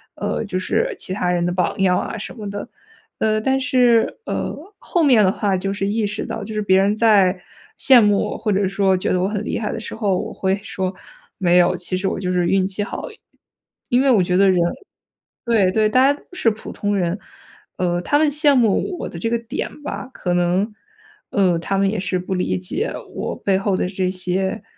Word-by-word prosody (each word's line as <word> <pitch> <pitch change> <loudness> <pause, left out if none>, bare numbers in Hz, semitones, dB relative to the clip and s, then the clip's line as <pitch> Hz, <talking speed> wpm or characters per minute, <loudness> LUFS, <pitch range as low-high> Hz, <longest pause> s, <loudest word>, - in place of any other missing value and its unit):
呃， - - -2
就 195 -2 -3
是 465 - 0
其 185 - -5
他 180 -2 -1
人 175 -1 0
的 175 - 0
榜 180 +1 -1
样 180 -1 +3
啊 225 - -3
什 210 - -7
么 210 -4 -6
的。 205 0 -6 0.5
呃， 215 0 +2
但 265 +4 +1
是， 250 - +2
呃， - - -3 0.3
后 345 -3 0
面 250 -8 +5
的 185 - +3
话 200 -2 0
就 195 +2 -2
是 195 0 -2
意 215 +1 0
识 205 - -4
到 220 - -5
就 220 - -7
是 210 - 0
别 190 -2 +3
人 200 +2 +3
在 200 -5 +4 0.4
羡 260 -3 +7
慕 205 -2 +3
我 - - -4
或 215 - -1
者 195 0 +1
说 195 -1 +2
觉 185 - -1
得 180 - +1
我 185 - +1
很 210 0 -3
厉 - - -2
害 210 -2 -2
的 225 - -4
时 - - -7
候， 200 -5 0
我 - - -4
会 190 0 0
说： 190 -2 -3 0.5
“没 180 -2 +3
有， 175 - +3
其 180 +1 -2
实 190 +1 -1
我 - - -2
就 180 -1 -2
是 175 -1 +1
运 190 0 +2
气 200 +1 -2
好 - - -6
而 - - -9
已。” - - -21 0.7
因 245 +1 +3
为 275 - +3
我 200 -6 +4
觉 180 0 0
得 195 0 +5
人 180 - +2 0.9
对 220 -6 +3
对， 215 -1 +3
大 255 +4 +4
家 285 - -10
都 - - -22
是 300 -10 +2
普 215 +1 -8
通 205 0 -2
人。 180 0 0 0.6
呃， 175 -1 0
他 290 +10 +1
们 310 -1 +3
羡 290 -1 +4
慕 245 - +2
我 - - -4
的 170 - -8
这 225 - -1
个 235 - +1
点 230 +5 -6
吧 285 - -5
可 180 - -2
能， 180 +5 +1 0.6
呃， 185 -4 +2
他 195 +4 -2
们 195 0 +2
也 210 -1 -2
是 185 0 -1
不 185 +1 -3
理 180 - 0
解 300 - -3 0.2
我 - - -3
背 195 -1 +1
后 195 0 0
的 180 - 0
这 185 -1 -1
些 190 +3 -2
200 Hz, 250 characters per minute, -20 LUFS, 185-225 Hz, 0.9 s, 羡